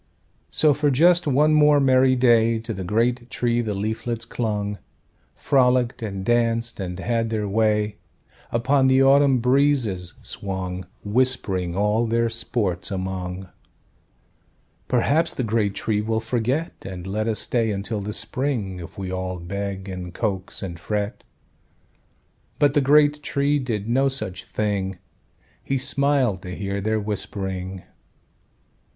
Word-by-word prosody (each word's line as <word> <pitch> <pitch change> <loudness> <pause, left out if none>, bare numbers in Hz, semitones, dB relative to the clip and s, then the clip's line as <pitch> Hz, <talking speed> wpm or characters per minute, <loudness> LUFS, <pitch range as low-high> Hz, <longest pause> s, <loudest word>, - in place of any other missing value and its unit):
So, 150 -1 +3
for 145 +1 +1
just 170 +5 +4
one 150 +3 +4
more 150 -1 +5
merry 130 -1 +4
day 115 -2 +4
To 115 0 -5
the 95 -2 -5
great 120 +5 0
Tree 120 -1 0
the 105 -3 -3
leaflets 110 +3 -3
clung, 105 -3 -3 0.6
Frollicked 125 -3 +2
and 100 -3 -4
danced, 115 -1 +1
and 90 -2 -4
had 115 +1 -1
their 110 -2 -1
way, 105 0 +1 0.5
Upon 130 +3 +2
the 130 +1 +5
autumn 135 0 +5
breezes 125 - +1
swung, 95 -2 -4 0.2
Whispering 100 -6 0
all 105 +4 +1
their 115 0 +1
sports 95 -6 -1
among— 95 -1 -4 1.4
"Perhaps 145 +7 +2
the 130 - -1
great 105 -3 0
Tree 105 +1 0
will 110 +1 -1
forget, 125 +7 -1
And 90 -2 -7
let 105 +3 -2
us 110 -2 0
stay 115 -2 0
until 105 +1 -3
the 105 +1 -4
spring, 110 -7 -2
If 85 - -10
we 95 -2 -4
all 95 0 -3
beg, 100 +2 -5
and 90 -2 -7
coax, 95 -5 -3
and 85 -3 -6
fret." 105 +3 -3 1.3
But 145 -2 +3
the 145 - +3
great 145 +2 +4
Tree 140 +1 +1
did 110 -6 -3
no 135 +4 +2
such 95 -9 -5
thing; 100 -3 -2 0.7
He 135 - -1
smiled 135 -7 +1
to 90 0 -7
hear 100 0 -3
their 110 +2 0
whispering. 95 -3 -4
110 Hz, 135 wpm, -23 LUFS, 95-130 Hz, 1.4 s, more